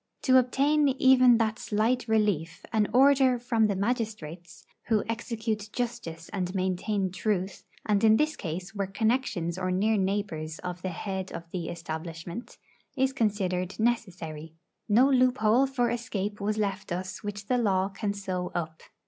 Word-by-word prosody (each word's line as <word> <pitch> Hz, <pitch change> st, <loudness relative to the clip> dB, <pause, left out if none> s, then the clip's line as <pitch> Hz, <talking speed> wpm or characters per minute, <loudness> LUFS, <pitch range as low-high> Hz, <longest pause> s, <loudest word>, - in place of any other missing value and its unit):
To 260 Hz, -1 st, +6 dB
obtain 285 Hz, +4 st, +2 dB
even 260 Hz, -2 st, +6 dB
that 220 Hz, -1 st, 0 dB
slight 225 Hz, +3 st, 0 dB
relief, 205 Hz, -7 st, 0 dB
an 215 Hz, -2 st, +3 dB
order 265 Hz, -1 st, +5 dB
from 235 Hz, -2 st, +2 dB
the 200 Hz, -, -1 dB
magistrates, 200 Hz, -, -4 dB, 0.2 s
who 220 Hz, -3 st, +2 dB
execute 225 Hz, -2 st, -3 dB
justice 230 Hz, -10 st, -4 dB
and 185 Hz, -2 st, -3 dB
maintain 190 Hz, +1 st, -1 dB
truth 190 Hz, 0 st, -2 dB, 0.2 s
and 205 Hz, -1 st, +1 dB
in 220 Hz, 0 st, +6 dB
this 305 Hz, +3 st, +1 dB
case 180 Hz, +5 st, -5 dB
were 200 Hz, -2 st, -2 dB
connections 195 Hz, -5 st, -1 dB
or 185 Hz, -1 st, -1 dB
near 210 Hz, +4 st, +2 dB
neighbours 190 Hz, -5 st, -2 dB
of 180 Hz, 0 st, -6 dB
the 185 Hz, -, -2 dB
head 190 Hz, +1 st, -4 dB
of -, -, -6 dB
the 175 Hz, -3 st, -4 dB
establishment 165 Hz, +4 st, -6 dB, 0.4 s
is 265 Hz, 0 st, +2 dB
considered 195 Hz, -6 st, -1 dB
necessary. 170 Hz, -9 st, -2 dB, 0.3 s
No 240 Hz, +6 st, +6 dB
loophole 255 Hz, -2 st, +3 dB
for 250 Hz, -3 st, 0 dB
escape 210 Hz, -3 st, -3 dB
was 210 Hz, +1 st, -1 dB
left 200 Hz, -2 st, -2 dB
us 185 Hz, +3 st, -4 dB
which 205 Hz, 0 st, -5 dB
the 250 Hz, +4 st, +1 dB
law 190 Hz, -4 st, +2 dB
can 200 Hz, +1 st, -3 dB
sew 185 Hz, -3 st, -4 dB
up. 160 Hz, -2 st, -4 dB
205 Hz, 150 wpm, -28 LUFS, 185-235 Hz, 0.4 s, To